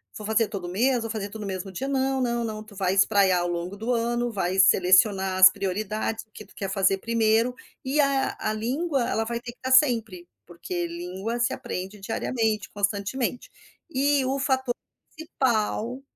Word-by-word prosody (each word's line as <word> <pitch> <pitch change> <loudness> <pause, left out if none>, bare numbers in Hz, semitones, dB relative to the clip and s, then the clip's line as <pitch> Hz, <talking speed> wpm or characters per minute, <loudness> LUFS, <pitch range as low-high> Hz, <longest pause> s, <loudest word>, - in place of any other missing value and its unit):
Vou 215 - -7
fazer 220 +1 +2
todo 200 -4 -6
o 175 - -5
mês, 245 +5 +2
vou 225 - -4
fazer 210 -2 -4
tudo 215 +1 -8
no 205 - -5
mesmo 190 0 -5
dia. 265 +9 -4
Não 270 -1 0
não 235 -1 0
não, 215 -1 -5
tu 215 -1 -16
vai 190 -1 0
espraiar 195 -2 +4
ao 175 - -1
longo 175 +2 -4
do 225 +4 -3
ano, 240 0 0
vai 190 -2 -1
selecionar 190 +1 +4
as 185 0 +11
prioridades, 210 +3 -3
o 215 - -44
que 215 - -11
tu - - -21
quer 195 -2 -4
fazer 195 0 +2
1º, 230 +2 +1 0.3
e 275 +3 -1
a 275 -1 +2
a 215 - -1
língua, 270 +7 -1
ela 225 - 0
vai 235 +1 -3
ter 240 0 -8
que - - -35
estar 260 - -1
sempre, 225 -10 +2 0.2
porque 175 0 -4
língua 185 +7 -5
se 245 +2 +1
aprende 205 -6 -6
diariamente, 220 +1 -2
constantemente. 205 +5 -2 0.4
E 280 -1 +2
o 270 +2 -1
fator 265 -2 0 0.4
principal, 250 -5 -1
220 Hz, 190 wpm, -25 LUFS, 195-245 Hz, 0.4 s, as